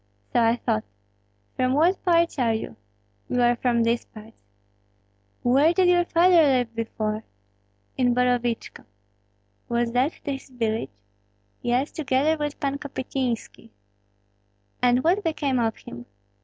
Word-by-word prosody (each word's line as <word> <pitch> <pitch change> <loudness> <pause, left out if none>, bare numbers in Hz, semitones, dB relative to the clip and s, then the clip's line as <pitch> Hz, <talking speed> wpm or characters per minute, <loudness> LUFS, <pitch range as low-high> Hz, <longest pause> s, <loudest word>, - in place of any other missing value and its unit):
"So 240 - +3
I 230 0 +3
thought. 110 - -1 0.7
From 255 0 +1
what 335 +7 +2
parts 335 -4 +2
are 230 -3 +2
you?" 220 - -6 0.5
"We 250 - 0
are 240 0 +4
from 240 -1 +1
these 230 +1 +1
parts." 220 +1 -14 1.1
"Where 275 +7 +4
did 370 -2 +4
your 350 -1 +3
father 345 0 +5
live 255 -6 +2
before?" 220 -1 -3 0.7
"In 245 -2 +2
Borovichko." 245 -2 -1 0.8
"Was 235 0 0
that 255 +6 +1
his 275 -2 -5
village?" 220 - -3 0.6
"Yes, 250 +4 0
together 290 +1 +1
with 295 -1 -4
Pan 280 -1 -2
Kopystynski." 260 -5 -4 1.1
"And 250 +1 +3
what 370 +5 +2
became 290 -6 0
of 225 -2 0
him?" 120 0 -11
250 Hz, 130 wpm, -24 LUFS, 230-295 Hz, 1.1 s, father